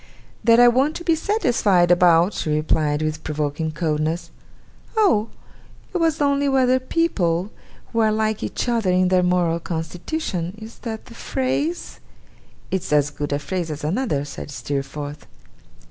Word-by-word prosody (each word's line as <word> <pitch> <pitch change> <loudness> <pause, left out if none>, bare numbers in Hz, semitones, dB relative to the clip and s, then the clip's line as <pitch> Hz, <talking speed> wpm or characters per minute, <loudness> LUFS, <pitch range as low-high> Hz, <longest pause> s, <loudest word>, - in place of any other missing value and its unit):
'That 230 0 +6
I 245 - +8
want 265 +6 +3
to 345 - -6
be 335 - +3
satisfied 240 - +2
about?' 175 +1 +5
she 160 - -3
replied, 150 0 +1
with 155 0 -3
provoking 150 +1 -2
coldness. 155 +1 -2 0.7
'Oh! 230 - +3 0.6
It 365 - 0
was 325 -1 +1
only 280 -1 +2
whether 260 -1 +3
people, 210 - 0 0.4
who 230 - +1
are 220 -1 +4
like 215 0 0
each - - -3
other 230 -5 +1
in 180 0 +3
their 185 -1 +4
moral 180 -2 +1
constitution 175 - -4
is 220 +1 -11
that 220 -2 -6
the 235 - -13
phrase?' 280 +8 -2 0.7
'It's 190 -5 -2
as 145 -1 +3
good 145 0 -4
a 145 - +1
phrase 165 +4 -3
as 150 -1 -6
another,' 155 - -1
said 145 - -8
Steerforth. 140 +3 -5
180 Hz, 150 wpm, -22 LUFS, 155-245 Hz, 0.7 s, I